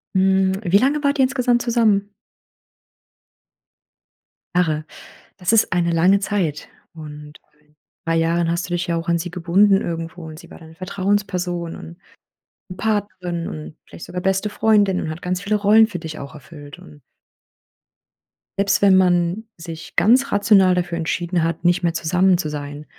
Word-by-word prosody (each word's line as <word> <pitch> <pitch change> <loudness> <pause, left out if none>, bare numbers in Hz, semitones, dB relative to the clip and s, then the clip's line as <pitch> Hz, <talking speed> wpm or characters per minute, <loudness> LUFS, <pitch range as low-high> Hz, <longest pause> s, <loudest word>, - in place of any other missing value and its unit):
Hm, 190 0 +3
wie 185 0 +4
lange 285 +6 +1
wart 285 0 +1
ihr - - +5
insgesamt 250 -2 +1
zusammen? 215 -4 +1 2.4
Jahre. 155 -4 +1 0.5
Das 180 +2 -1
ist 225 -3 +3
eine 175 -1 +1
lange 180 +4 +3
Zeit. 185 -7 -2 0.3
Und 150 -1 -11 0.2
in 150 0 -33 0.3
3 165 0 0
Jahren 165 +1 +1
hast 170 +1 -2
du 175 - -3
dich 175 +1 -2
ja 170 -2 -1
auch 165 0 -5
an 170 0 +2
sie 175 +2 -5
gebunden 190 +3 +3
irgendwo 165 0 -5
und 155 -1 -10
sie - - -15
war - - -12
deine 160 -1 -15
Vertrauensperson 185 -2 -2
und 80 +1 -11 0.8
Partnerin 185 -5 -3
und 155 0 -8
vielleicht - - -11
sogar 180 - -5
beste 190 +2 0
Freundin 205 -3 +2
und 155 - -4
hat 160 +2 -8
ganz 180 +1 -3
viele 205 +1 0
Rollen 210 +2 +5
für 205 -5 -6
dich 160 -2 -8
auch 140 +3 -9
erfüllt 145 0 -12
und 75 -1 -16 1.6
selbst 200 0 +1
wenn 195 -2 +5
man 180 +3 +1
sich 165 -1 -9
ganz 260 +5 +3
rational 200 -3 +4
dafür 175 -1 -2
entschieden 170 +1 -1
hat, 165 +1 -2
nicht 175 +1 +2
mehr 170 -1 +1
zusammen 180 +3 +2
zu 155 -4 -3
sein 145 0 -7
180 Hz, 160 wpm, -20 LUFS, 165-200 Hz, 2.4 s, ihr